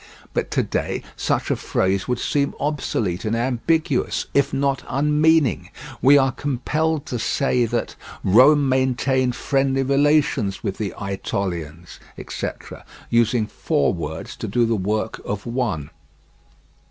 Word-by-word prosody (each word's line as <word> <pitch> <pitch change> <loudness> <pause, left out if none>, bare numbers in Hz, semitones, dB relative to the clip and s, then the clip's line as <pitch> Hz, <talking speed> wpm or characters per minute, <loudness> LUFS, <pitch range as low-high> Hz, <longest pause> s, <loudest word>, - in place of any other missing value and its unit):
But - - -1
to - - +1
day - - -2
such - - -1
a - - +2
phrase 95 0 -1
would 125 - 0
seem 140 +3 0
obsolete 115 - -1
and 110 +1 0
ambiguous, 130 +4 0
if 140 0 +2
not 135 -1 0
unmeaning: 150 - +2 0.3
we 140 +2 +7
are 135 -1 +3
compelled 145 +3 -1
to 120 - -4
say 125 +1 +1
that 120 +1 -2 0.3
"Rome 135 +8 +6
maintained 130 -1 +1
friendly 135 -1 +1
relations 140 -7 +2
with 95 - -3
the 105 -3 -2
Ætolians," 90 -4 -4 0.2
etc., - - -6 0.3
using 115 -1 +3
four 70 -7 0
words 80 -2 -6
to 110 - -5
do 115 +4 +2
the 115 0 +1
work 105 +3 -2
of 105 0 -4
one. 115 - -2
125 Hz, 130 wpm, -22 LUFS, 105-140 Hz, 0.3 s, we